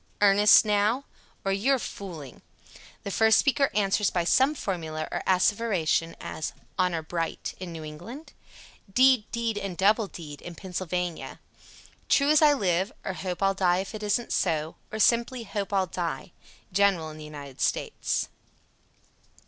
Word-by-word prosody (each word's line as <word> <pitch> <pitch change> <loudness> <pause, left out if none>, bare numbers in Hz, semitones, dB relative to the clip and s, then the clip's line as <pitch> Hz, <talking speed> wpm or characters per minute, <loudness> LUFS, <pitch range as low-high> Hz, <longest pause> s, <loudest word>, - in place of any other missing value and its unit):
"Earnest, 205 +2 +6
now?" 210 +5 +2 0.4
or, 195 - +1
"You 210 +8 +2
are - - -1
fooling." 170 - -8 0.6
The 200 - -4
first 220 +2 +4
speaker 280 0 +3
answers 205 -1 +2
by 175 - 0
some 265 - +3
formula 160 - -4
or - - -2
asseveration, 185 -4 +1
as, 155 - -5 0.2
"Honor 175 -3 0
bright" 165 0 -4
(New 165 -3 -6
England); 175 - -9 0.6
"Deed, 255 -1 +4
deed, 230 -2 -1
and 195 -4 -5
double 210 +2 +3
deed" 150 -6 -10 0.2
(Pennsylvania); 180 -2 -4 0.7
"True 280 +1 +4
as 305 - +5
I 300 -1 +6
live," 190 -5 0
or, 190 - -2
"Hope 185 0 -4
I'll 195 0 +3
die 180 -2 +2
if 190 +3 -4
it 215 - -6
isn't 210 +3 -1
so," 160 -2 0 0.2
or 215 - -4
simply, 235 +2 +2
"Hope 200 -1 -4
I'll 195 -2 +2
die." 170 -3 -4 0.4
_General 190 -5 +2
in 155 - -11
the - - -8
United 145 -3 -10
States. - - -1
195 Hz, 150 wpm, -27 LUFS, 170-220 Hz, 0.7 s, Earnest